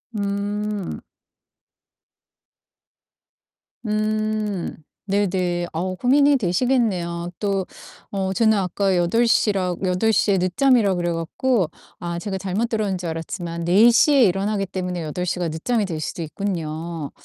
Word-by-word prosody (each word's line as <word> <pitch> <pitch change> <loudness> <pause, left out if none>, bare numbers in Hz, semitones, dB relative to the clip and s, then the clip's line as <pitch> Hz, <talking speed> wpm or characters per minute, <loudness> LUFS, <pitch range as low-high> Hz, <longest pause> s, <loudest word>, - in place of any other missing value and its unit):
음. 205 0 -2 2.9
음. 215 -2 -1 0.5
네네. 175 -2 -1
어 185 +3 -2
고민이 280 +5 +4
되시겠네요. 180 -5 0
또 195 -3 0 0.5
어 190 -1 -1
저는 220 0 +3
아까 190 0 0
8:00 215 +4 +3
라 180 -2 0
8:00 200 +3 +2
에 195 - +3
늦잠이라 200 +2 +3
그래 175 -1 -1
갖고 180 +3 0 0.3
아 170 -1 -4
제가 195 0 -3
잘못 195 +5 -1
들었는 215 -4 -1
줄 180 -1 -5
알았지만 170 +1 -5
4:00 230 - +5
에 270 -3 +6
일어나기 195 +1 0
때문에 180 -2 -4
8:00 180 +4 -3
가 175 - 0
늦잠이 205 +8 -1
될 160 -4 -4
수도 170 - -4
있군요. 165 -3 -4
190 Hz, 210 characters per minute, -22 LUFS, 175-215 Hz, 2.9 s, 에